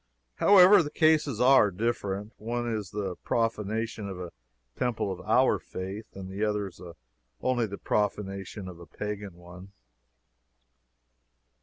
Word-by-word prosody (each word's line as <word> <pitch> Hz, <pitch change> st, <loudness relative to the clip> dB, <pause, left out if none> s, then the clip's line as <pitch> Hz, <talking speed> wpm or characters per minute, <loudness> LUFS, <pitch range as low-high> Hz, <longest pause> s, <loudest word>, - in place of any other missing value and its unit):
However, 195 Hz, 0 st, +7 dB
the 150 Hz, -, -3 dB
cases 155 Hz, -7 st, +2 dB
are 130 Hz, -4 st, +6 dB
different. 105 Hz, 0 st, -3 dB
One 120 Hz, +2 st, -3 dB
is 110 Hz, -5 st, -3 dB
the 95 Hz, -3 st, -4 dB
profanation 110 Hz, -1 st, -2 dB
of 95 Hz, -2 st, -7 dB
a 90 Hz, -2 st, -6 dB, 0.4 s
temple 120 Hz, -5 st, -1 dB
of 95 Hz, -, -6 dB
our -, -, +3 dB
faith 95 Hz, +4 st, -7 dB
the 95 Hz, +2 st, -5 dB
other 105 Hz, -2 st, -1 dB, 0.7 s
only 120 Hz, -3 st, 0 dB
the 100 Hz, 0 st, -7 dB
profanation 100 Hz, -1 st, -2 dB
of 90 Hz, -2 st, -9 dB
a 85 Hz, -, -12 dB
pagan 105 Hz, -3 st, -6 dB
one. 90 Hz, +2 st, -13 dB
105 Hz, 125 wpm, -28 LUFS, 95-115 Hz, 0.7 s, However